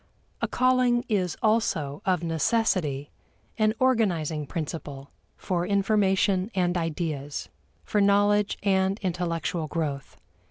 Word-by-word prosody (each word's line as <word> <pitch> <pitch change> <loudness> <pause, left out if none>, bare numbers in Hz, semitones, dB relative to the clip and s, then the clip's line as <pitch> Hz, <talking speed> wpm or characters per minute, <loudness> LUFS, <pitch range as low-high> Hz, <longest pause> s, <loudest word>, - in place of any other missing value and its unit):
A - - +1
calling 255 -1 +2
is 185 -6 0
also 165 -10 +1
of 180 -3 +1
necessity 165 -4 0 0.5
an 215 0 +3
organizing 175 - +1
principle 145 -4 -6 0.3
for 175 -2 -1
information 195 0 +2
and 180 -1 +1
ideas; 155 -4 -3 0.3
for 210 - 0
knowledge 205 0 +3
and 190 0 +2
intellectual 170 -2 -2
growth. 145 -4 -4
185 Hz, 105 wpm, -26 LUFS, 160-205 Hz, 0.5 s, an